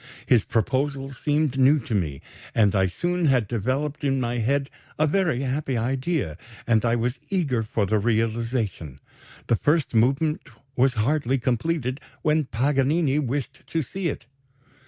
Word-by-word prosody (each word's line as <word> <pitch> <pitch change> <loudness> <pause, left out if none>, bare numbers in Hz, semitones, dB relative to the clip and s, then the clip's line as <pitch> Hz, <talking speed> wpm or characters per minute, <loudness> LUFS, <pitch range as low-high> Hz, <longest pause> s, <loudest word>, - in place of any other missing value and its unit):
"His 120 -5 +4
proposal 135 +4 -1
seemed 145 0 0
new 135 +4 +6
to 115 - -5
me, 80 -9 -1 0.3
and 105 -4 +4
I 95 -1 +3
soon 175 - -1
had 130 -7 +3
developed 130 +8 -2
in 135 -1 +1
my 120 -1 -1
head 140 +4 0 0.3
a 155 - +3
very 155 -5 +1
happy 135 -1 -1
idea, 130 - -1 0.3
and 110 -2 +3
I 115 -1 +2
was 120 +2 -1
eager 150 -12 0
for 110 -1 -1
the 105 +2 +1
realization. 110 - -1 0.5
The 115 - +2
first 150 +3 +1
movement 135 +7 +1 0.3
was 125 +1 +3
hardly 135 +3 +1
completed, 130 +2 -1 0.2
when 155 -1 +2
Paganini 140 +4 +1
wished 140 -1 -3
to 165 -1 -1
see 185 +7 -4
it. 140 - -4
130 Hz, 150 wpm, -24 LUFS, 115-145 Hz, 0.5 s, new